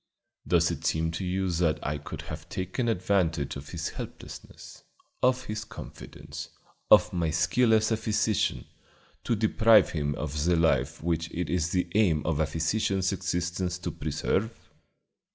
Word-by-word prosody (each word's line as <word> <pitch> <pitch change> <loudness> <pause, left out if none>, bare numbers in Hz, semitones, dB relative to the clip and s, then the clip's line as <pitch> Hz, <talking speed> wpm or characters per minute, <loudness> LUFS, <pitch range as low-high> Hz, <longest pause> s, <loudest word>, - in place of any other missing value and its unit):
Does - - +3
it - - -5
seem 80 +1 0
to 85 +3 -4
you 95 0 -1
that 85 -2 +1
I 75 0 -2
could 75 - -7
have 75 +2 -8
taken 95 +8 -2
advantage 90 - 0
of 70 +1 -8
his 85 -2 -3
helplessness, - - -10 0.4
of 130 0 +3
his 110 -2 -4
confidence, - - -9 0.4
of - - +6
my 85 -3 0
skill 110 +10 +2
as 110 0 +3
a 110 - +2
physician, 105 - 0 0.6
to 115 - +1
deprive 110 -1 +5
him 75 -2 -1
of 75 0 -3
the 90 0 +3
life 80 -1 +1
which 85 0 -1
it 90 +1 -3
is 85 -2 +1
the 90 +1 0
aim 90 -8 +2
of 80 -1 0
a 80 - +2
physician's 95 +4 0
existence 90 -1 -2
to 90 - -4
preserve?" 110 +3 -1
90 Hz, 155 wpm, -28 LUFS, 80-105 Hz, 0.6 s, of